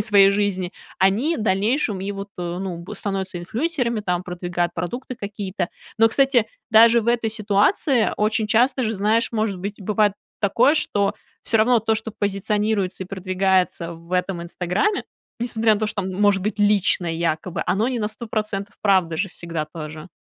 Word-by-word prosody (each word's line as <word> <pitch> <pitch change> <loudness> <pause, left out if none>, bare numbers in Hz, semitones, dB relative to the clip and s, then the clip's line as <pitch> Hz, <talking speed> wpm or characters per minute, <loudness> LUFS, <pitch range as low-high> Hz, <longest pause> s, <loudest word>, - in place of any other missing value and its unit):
и - - +2
своей 205 -2 +6
жизни, 200 -3 0 0.3
они 220 - +2
дальнейшем 210 +1 0
и 200 +1 -3
вот, 195 0 -6
э, 175 0 -4
ну 175 -3 -5
в - - -7
становятся 195 -2 -3
инфлюенсерами, 235 - -1
там, 180 -3 -1
продвигают 175 -1 -2
продукты 245 +10 -4
какие-то. 200 -4 -4 0.3
Но, 225 0 +5
кстати, 260 -2 +3 0.2
даже 230 +2 +7
в 220 - -7
этой 235 -1 +1
ситуации 215 - +2
очень 215 +1 +1
часто 250 +4 +3
же, 225 -1 -1
знаешь, 215 +4 +1
может 215 -4 -1
быть, 200 +3 -6
бывает 210 +1 +2 0.3
такое, 235 +8 +4
что 205 -9 0 0.3
всё 225 - +1
равно 235 +2 +4
то, 220 +1 +1
что 220 0 -4
позиционируется 205 -1 -1
и - - -13
продвигается 185 -2 0
в 170 +2 -14
этом 180 -1 -1
"Инстаграме", 180 - -1 0.4
несмотря 225 -2 +2
на 205 - -4
то, 215 - +1
что 210 -1 -2
там 185 0 -4
может 200 0 +2
быть 215 +1 -2
личное 195 -4 +2
якобы, 165 +1 -2
оно 215 +5 +1
не 250 -2 -2
на 210 - 0
100% 215 -2 -4
правда 185 -5 +3
же 190 +3 -1
всегда 165 -3 -4
тоже. 155 +1 -8
205 Hz, 170 wpm, -22 LUFS, 185-220 Hz, 0.4 s, даже